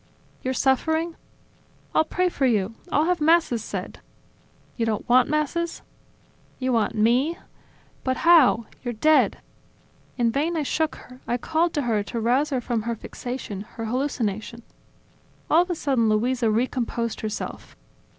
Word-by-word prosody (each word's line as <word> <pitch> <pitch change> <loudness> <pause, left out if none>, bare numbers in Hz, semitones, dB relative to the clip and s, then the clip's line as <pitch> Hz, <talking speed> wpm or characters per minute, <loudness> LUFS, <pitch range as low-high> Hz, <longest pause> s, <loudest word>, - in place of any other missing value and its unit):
You're 260 0 -2
suffering? 320 +6 +1 0.8
I'll - - +4
pray 365 +3 0
for 280 -6 +1
you, 210 -3 +1 0.2
I'll 300 - +3
have 355 -1 0
Masses 310 -8 +3
said... - - -6 0.8
You 235 - -1
don't 220 -2 -1
want 250 +2 +5
Masses?... 305 +3 -1 0.7
You 260 -1 -1
want 225 -1 +1
me?... 245 +10 +2 0.7
But 260 -1 0
how? 310 -9 +6 0.2
You're 240 -2 -3
dead!.. 310 +8 +3 0.4
." - - -34
In 235 -2 +2
vain 315 +7 0
I 305 - 0
shook 315 +3 -1
her, 250 0 -14
I 240 - 0
called 325 +6 0
to 290 - 0
her 225 -4 +1
to 230 +3 -4
rouse 250 +6 +2
her 265 -3 0
from 235 -2 -1
her 235 +2 -2
fixation, 235 -3 -6 0.2
her 225 - -3
hallucination... 235 -3 -2 0.9
All 325 - +7
of 360 - -2
a 350 - 0
sudden 260 -8 +1
Luisa 235 +2 +1
recomposed 235 0 -1
herself. 215 -1 -5
255 Hz, 150 wpm, -24 LUFS, 230-310 Hz, 0.9 s, All